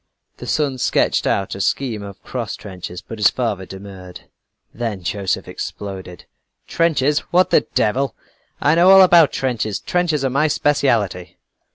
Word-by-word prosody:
The -, -, -9 dB
son 140 Hz, -4 st, 0 dB
sketched -, -, +1 dB
out 95 Hz, -1 st, 0 dB
a 95 Hz, -, -5 dB
scheme 115 Hz, 0 st, -1 dB
of 100 Hz, -1 st, -10 dB
cross 120 Hz, -4 st, -4 dB
trenches, 90 Hz, -3 st, -9 dB
but 115 Hz, -, -9 dB
his 105 Hz, -, +6 dB
father 105 Hz, -7 st, -3 dB
demurred 95 Hz, -2 st, -10 dB, 0.5 s
then 110 Hz, -5 st, -4 dB
Joseph 95 Hz, +1 st, -2 dB
exploded: 95 Hz, -3 st, -7 dB, 0.4 s
"Trenches! 150 Hz, -3 st, +1 dB
What 180 Hz, +1 st, +3 dB
the -, -, +3 dB
devil! 125 Hz, +3 st, +1 dB, 0.4 s
I 150 Hz, -, +3 dB
know 175 Hz, +3 st, +5 dB
all 195 Hz, 0 st, +9 dB
about 170 Hz, -4 st, +6 dB
trenches; 110 Hz, -6 st, -2 dB
trenches 165 Hz, -6 st, 0 dB
are 130 Hz, -, 0 dB
my 145 Hz, +4 st, +2 dB
specialty." 115 Hz, -, 0 dB
115 Hz, 150 wpm, -20 LUFS, 95-145 Hz, 0.5 s, all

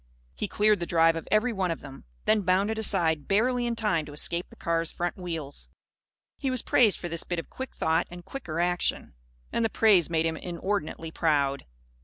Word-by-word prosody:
He 65 Hz, -, -3 dB
cleared 210 Hz, -1 st, +3 dB
the 170 Hz, -, -3 dB
drive 165 Hz, -1 st, +4 dB
of 165 Hz, -, -5 dB
every 230 Hz, +3 st, +2 dB
one 190 Hz, -3 st, 0 dB
of 165 Hz, -, -3 dB
them; 135 Hz, -, -11 dB, 0.2 s
then 215 Hz, -1 st, +4 dB
bounded 195 Hz, +4 st, +1 dB
aside 165 Hz, -8 st, +1 dB
barely 240 Hz, +4 st, +2 dB
in 235 Hz, -, -1 dB
time 210 Hz, -8 st, +1 dB
to 145 Hz, -, -9 dB
escape 170 Hz, +4 st, -2 dB
the -, -, -15 dB
car's 165 Hz, -1 st, -1 dB
front 175 Hz, 0 st, -2 dB
wheels. 165 Hz, -6 st, -5 dB, 0.7 s
He 275 Hz, -, -1 dB
was 255 Hz, -3 st, 0 dB
praised 220 Hz, -5 st, +4 dB
for 175 Hz, -, -5 dB
this 170 Hz, -1 st, -1 dB
bit 175 Hz, -, -3 dB
of 165 Hz, -, -6 dB
quick 260 Hz, 0 st, -7 dB
thought 160 Hz, +2 st, +1 dB
and 175 Hz, 0 st, -10 dB
quicker 170 Hz, -12 st, -5 dB
action. 175 Hz, 0 st, 0 dB, 0.4 s
And 235 Hz, -, 0 dB
the 225 Hz, -, +2 dB
praise 205 Hz, -7 st, +4 dB
made 165 Hz, -1 st, +1 dB
him 160 Hz, 0 st, -1 dB
inordinately 170 Hz, -2 st, -3 dB
proud. 140 Hz, -4 st, +1 dB
175 Hz, 200 wpm, -27 LUFS, 165-215 Hz, 0.7 s, drive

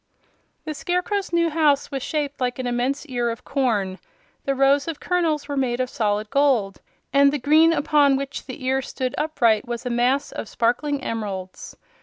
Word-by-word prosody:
The 310 Hz, -, -3 dB
Scarecrow's 360 Hz, +5 st, -2 dB
new 335 Hz, -1 st, +2 dB
house 300 Hz, -3 st, +2 dB
was 270 Hz, -1 st, -3 dB
shaped 290 Hz, -1 st, -3 dB
like 245 Hz, -1 st, -1 dB
an 255 Hz, -, -4 dB
immense 245 Hz, +5 st, -1 dB
ear 245 Hz, -4 st, -1 dB
of 230 Hz, +1 st, -6 dB
corn. 210 Hz, -9 st, 0 dB, 0.5 s
The 275 Hz, -, 0 dB
rows 275 Hz, +2 st, +3 dB
of 325 Hz, -3 st, -4 dB
kernels 330 Hz, -5 st, 0 dB
were 285 Hz, -, -3 dB
made 255 Hz, -3 st, 0 dB
of 255 Hz, 0 st, -1 dB
solid 210 Hz, -1 st, -1 dB
gold, 255 Hz, -9 st, +2 dB, 0.3 s
and 280 Hz, 0 st, +5 dB
the 295 Hz, -, -1 dB
green 310 Hz, +4 st, +5 dB
upon 290 Hz, -3 st, +3 dB
which 275 Hz, +1 st, -5 dB
the 255 Hz, -1 st, -7 dB
ear 265 Hz, +1 st, +1 dB
stood 255 Hz, -1 st, -4 dB
upright 240 Hz, -9 st, +1 dB
was 240 Hz, +1 st, -5 dB
a 250 Hz, -, -2 dB
mass 250 Hz, +4 st, +1 dB
of -, -, -6 dB
sparkling 270 Hz, +4 st, 0 dB
emeralds. 195 Hz, -5 st, -5 dB
270 Hz, 180 wpm, -23 LUFS, 240-295 Hz, 0.5 s, and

